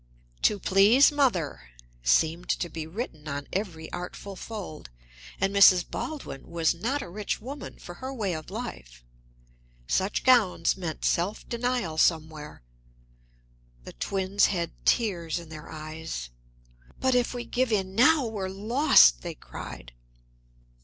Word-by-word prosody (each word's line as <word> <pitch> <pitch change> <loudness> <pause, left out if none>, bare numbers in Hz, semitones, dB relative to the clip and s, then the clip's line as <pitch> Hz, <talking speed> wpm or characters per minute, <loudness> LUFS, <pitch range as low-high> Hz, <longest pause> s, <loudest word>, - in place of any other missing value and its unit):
"To 210 - +3
please 205 +10 +5
Mother" 195 - 0 0.3
seemed 160 - +2
to 175 - 0
be 160 0 -6
written 160 -5 -6
on 140 -1 -4
every 175 -5 -3
artful 180 +2 -6
fold. 190 - -8 0.5
And 195 +1 0
Mrs. 185 -3 +7
Baldwin 290 - -6
was 165 -2 +1
not 240 +12 -2
a - - -8
rich 200 +4 -3
woman, 270 +6 -8
for 175 - -10
her 260 +1 -4
way 210 -8 -2
of 155 -1 -6
life; - - -7 0.8
such 190 - 0
gowns 225 -10 +4
meant 170 -4 -5
self 185 +5 0
denial 235 -9 -1
somewhere. 155 - 0 1.2
The - - -10
twins 195 - +1
had 170 -4 -2 0.2
tears 180 -9 +1
in 170 -2 -8
their 155 -1 -10
eyes. 155 - -6 0.7
"But 260 0 +2
if 250 0 +1
we 240 0 -4
give 255 -1 0
in 190 -3 0
now, 275 +6 +5
we're 205 -4 -3
lost!" 195 - +5
they - - -6
cried. - - -9
185 Hz, 135 wpm, -27 LUFS, 160-225 Hz, 1.2 s, Mrs